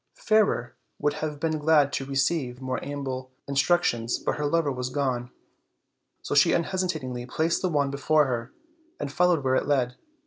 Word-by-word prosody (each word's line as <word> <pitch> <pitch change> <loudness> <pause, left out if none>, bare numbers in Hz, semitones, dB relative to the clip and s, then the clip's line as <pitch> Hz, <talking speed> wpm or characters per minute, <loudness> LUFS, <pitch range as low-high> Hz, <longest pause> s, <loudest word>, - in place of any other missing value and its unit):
Fairer 215 - +2 0.2
would 145 0 0
have 150 -2 -3
been 155 0 -1
glad 150 -2 +4
to 135 - -2
have - - -12
received 135 -2 0
more 130 -1 -3
ample 135 -2 -4 0.2
instructions, 140 -5 +1
but - - -2
her 150 -1 0
lover 160 -1 +1
was 125 -1 -3
gone; 130 -3 -1 0.9
so - - -3
she - - +5
un 170 - +2
hesitatingly 155 -10 -3
placed 160 +5 0
the 185 - +1
wand 145 -4 +1
before 145 +2 +3
her, 120 -2 -3 0.5
and 140 - -4
followed 175 -4 +3
where 130 -1 +1
it 130 - +1
led. 125 -4 +1
140 Hz, 175 wpm, -26 LUFS, 130-155 Hz, 0.9 s, she